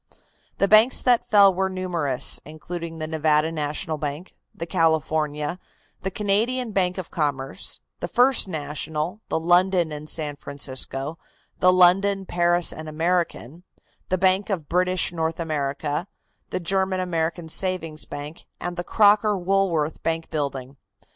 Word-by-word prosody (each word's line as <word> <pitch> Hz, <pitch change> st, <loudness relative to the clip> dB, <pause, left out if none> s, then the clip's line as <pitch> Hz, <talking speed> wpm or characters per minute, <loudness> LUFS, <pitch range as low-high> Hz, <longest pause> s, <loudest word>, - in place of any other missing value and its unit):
The 200 Hz, -, +2 dB
banks 215 Hz, +5 st, +5 dB
that 245 Hz, -2 st, +3 dB
fell 200 Hz, -2 st, +6 dB
were 190 Hz, +1 st, 0 dB
numerous, 175 Hz, -8 st, -1 dB
including 165 Hz, +2 st, -7 dB
the 155 Hz, -, -3 dB
Nevada 155 Hz, 0 st, +1 dB
National 155 Hz, +1 st, -3 dB
Bank, 150 Hz, +5 st, -5 dB, 0.2 s
the 165 Hz, -, -6 dB
California, 160 Hz, -1 st, 0 dB, 0.4 s
the 190 Hz, -, -2 dB
Canadian 220 Hz, +5 st, 0 dB
Bank 185 Hz, -2 st, 0 dB
of 185 Hz, -3 st, -6 dB
Commerce, 145 Hz, -5 st, -2 dB, 0.2 s
the -, -, -3 dB
First 250 Hz, -2 st, +3 dB
National, 155 Hz, +2 st, -4 dB
the -, -, 0 dB
London 175 Hz, 0 st, +3 dB
and 150 Hz, +1 st, -7 dB
San 150 Hz, -3 st, -2 dB
Francisco, 140 Hz, +2 st, -2 dB, 0.4 s
the 185 Hz, -, +5 dB
London, 190 Hz, +2 st, +4 dB
Paris 175 Hz, -1 st, +1 dB
and 155 Hz, 0 st, -8 dB
American, 165 Hz, -2 st, -1 dB, 0.5 s
the 185 Hz, -, +1 dB
Bank 190 Hz, +3 st, +2 dB
of 170 Hz, -7 st, -2 dB
British 180 Hz, 0 st, +1 dB
North 165 Hz, -1 st, -2 dB
America, 150 Hz, +1 st, -2 dB, 0.4 s
the -, -, -2 dB
German 190 Hz, +1 st, 0 dB
American 170 Hz, -1 st, -2 dB
Savings 165 Hz, -2 st, 0 dB
Bank 145 Hz, +3 st, -8 dB
and 175 Hz, 0 st, -5 dB
the 175 Hz, -, -2 dB
Crocker 210 Hz, +1 st, +4 dB
Woolworth 175 Hz, -5 st, 0 dB
Bank 165 Hz, 0 st, -2 dB
building. 140 Hz, -3 st, -3 dB
170 Hz, 135 wpm, -24 LUFS, 155-185 Hz, 0.5 s, fell